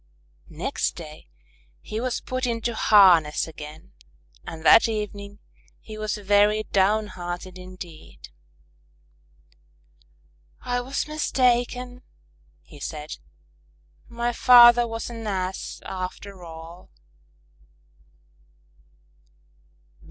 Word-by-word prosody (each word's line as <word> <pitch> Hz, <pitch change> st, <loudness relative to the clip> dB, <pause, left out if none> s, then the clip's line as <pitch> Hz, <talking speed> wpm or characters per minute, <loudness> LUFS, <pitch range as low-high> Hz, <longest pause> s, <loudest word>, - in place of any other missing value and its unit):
Next 175 Hz, -, -3 dB
day 155 Hz, -, -11 dB, 0.5 s
he 215 Hz, -, -5 dB
was 255 Hz, -1 st, -2 dB
put 255 Hz, 0 st, -3 dB
into 235 Hz, 0 st, -2 dB
harness 180 Hz, -10 st, +5 dB
again 155 Hz, -1 st, -11 dB, 0.5 s
and 160 Hz, 0 st, -8 dB
that 225 Hz, -, +7 dB
evening 205 Hz, -2 st, -5 dB, 0.4 s
he 215 Hz, -, -11 dB
was 215 Hz, 0 st, -3 dB
very 205 Hz, +1 st, +3 dB
downhearted 190 Hz, -3 st, -1 dB
indeed. 180 Hz, -3 st, -12 dB, 2.3 s
"I 245 Hz, 0 st, -2 dB
was 265 Hz, +4 st, -3 dB
mistaken," 250 Hz, -4 st, 0 dB, 0.6 s
he 105 Hz, -, -15 dB
said. 150 Hz, +1 st, -6 dB, 0.9 s
"My 235 Hz, 0 st, -2 dB
father 240 Hz, 0 st, +7 dB
was 225 Hz, +1 st, -5 dB
an 225 Hz, -2 st, -7 dB
Ass 190 Hz, -2 st, -4 dB
after 185 Hz, 0 st, -7 dB
all." 165 Hz, +1 st, -11 dB
205 Hz, 85 wpm, -24 LUFS, 175-235 Hz, 2.3 s, that